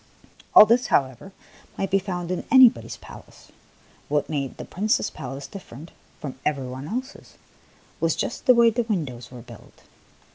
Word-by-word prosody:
All - - +11
this, 240 +3 +2
how 140 - +3
ever, 130 +9 -13 0.5
might 195 - -3
be 195 - +3
found 180 -2 -5
in 185 - -3
anybody's 260 -3 +5
palace; - - -15 0.6
what 145 0 0
made 140 -3 -3
the - - -7
Prince's 210 +4 -1
palace 135 +2 -7
different 165 -5 -11 0.3
from 135 -3 -7
every 140 -3 -1
one 130 +3 -7
else's 255 - -7 0.6
was - - +1
just - - -4
the 255 - +7
way 235 -1 +5
the 240 +2 0
win 210 -9 -1
dows 125 -2 -10
were 125 -2 -11
built. - - -16
175 Hz, 170 wpm, -24 LUFS, 135-220 Hz, 0.6 s, All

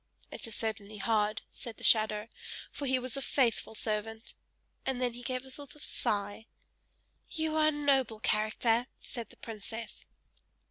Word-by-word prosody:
"It 260 - -5
is 225 - -4
certainly 215 -1 -2
hard," 215 0 +2
said 230 -2 -7
the - - -12
shadow, 215 -1 +5 0.4
"for 285 - -3
he 260 0 +4
was 255 -1 -2
a 275 - 0
faithful 240 -5 +2
servant!" 220 +1 -2 0.5
and 265 -2 0
then 250 -2 +1
he 245 - -8
gave 255 +1 -2
a 265 - -3
sort 285 +1 -5
of 300 - -3
sigh. 205 +2 -1 0.8
"You 315 -1 0
are 310 -1 +6
a - - +6
noble 275 -6 +3
character!" 225 +1 +3
said 235 -2 -6
the - - -17
princess. 225 0 -5
230 Hz, 160 wpm, -33 LUFS, 215-260 Hz, 0.8 s, are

